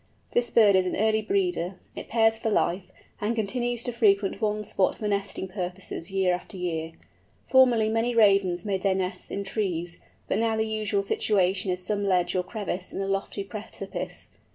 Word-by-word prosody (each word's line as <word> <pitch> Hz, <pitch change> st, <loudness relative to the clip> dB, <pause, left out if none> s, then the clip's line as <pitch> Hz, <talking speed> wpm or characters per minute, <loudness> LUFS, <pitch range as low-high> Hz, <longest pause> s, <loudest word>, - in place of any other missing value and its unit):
This 240 Hz, 0 st, +1 dB
bird 210 Hz, -4 st, +5 dB
is 185 Hz, -1 st, +3 dB
an -, -, -1 dB
early 220 Hz, +1 st, +2 dB
breeder. 355 Hz, -, 0 dB, 0.2 s
It -, -, -7 dB
pairs 225 Hz, -1 st, +4 dB
for 225 Hz, 0 st, -2 dB
life, 185 Hz, -3 st, 0 dB, 0.3 s
and 215 Hz, +3 st, 0 dB
continues 240 Hz, +2 st, -1 dB
to 245 Hz, -, 0 dB
frequent 200 Hz, -3 st, +2 dB
one 210 Hz, 0 st, 0 dB
spot 195 Hz, -2 st, 0 dB
for 215 Hz, -, -3 dB
nesting 200 Hz, -1 st, -2 dB
purposes 185 Hz, -1 st, -5 dB
year 190 Hz, -2 st, +2 dB
after 180 Hz, +2 st, -6 dB
year. 165 Hz, -2 st, -3 dB, 0.5 s
Formerly 250 Hz, -4 st, +5 dB
many 225 Hz, +2 st, 0 dB
Ravens 195 Hz, -5 st, +4 dB
made 195 Hz, -2 st, -1 dB
their 195 Hz, -1 st, +2 dB
nests 185 Hz, 0 st, -3 dB
in 200 Hz, -, -3 dB
trees, 180 Hz, -4 st, -2 dB, 0.3 s
but 200 Hz, -, 0 dB
now 225 Hz, -1 st, +1 dB
the 220 Hz, -, +1 dB
usual 215 Hz, -2 st, -1 dB
situation 195 Hz, -1 st, +1 dB
is 180 Hz, 0 st, -2 dB
some 205 Hz, +1 st, -1 dB
ledge 180 Hz, -2 st, +1 dB
or 185 Hz, -, +2 dB
crevice 185 Hz, -1 st, -5 dB
in -, -, -5 dB
a -, -, -1 dB
lofty 195 Hz, +1 st, -2 dB
precipice. 215 Hz, +2 st, -7 dB
200 Hz, 180 wpm, -26 LUFS, 185-220 Hz, 0.5 s, bird